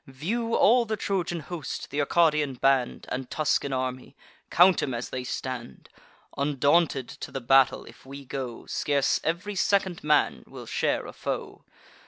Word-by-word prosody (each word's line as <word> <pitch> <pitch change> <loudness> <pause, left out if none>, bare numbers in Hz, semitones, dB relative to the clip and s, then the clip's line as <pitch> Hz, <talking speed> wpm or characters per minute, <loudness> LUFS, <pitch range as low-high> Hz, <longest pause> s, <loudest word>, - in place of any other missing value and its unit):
View 220 - -2
all 240 +2 +5
the 215 -1 -2
Trojan 175 -4 -2
host, 160 -1 -6
th' 145 - -2
Arcadian 150 -2 +2
band, 135 0 +1
And 130 0 -4
Tuscan 150 -2 0
army; 130 -1 -3 0.3
count 180 +1 +5
'em 130 -4 -2
as 120 - -5
they 130 -1 -3
stand: 125 - -6 0.5
Undaunted 140 0 +2
to - - -9
the 135 - -4
battle 135 +1 +3
if - - -15
we 140 +1 -10
go, 125 -3 -6
Scarce 140 -2 +1
ev'ry 175 +6 -2
second 190 -2 +1
man 150 0 +2
will - - -10
share - - -1
a - - -9
foe. - - -5
145 Hz, 155 wpm, -26 LUFS, 130-175 Hz, 0.5 s, all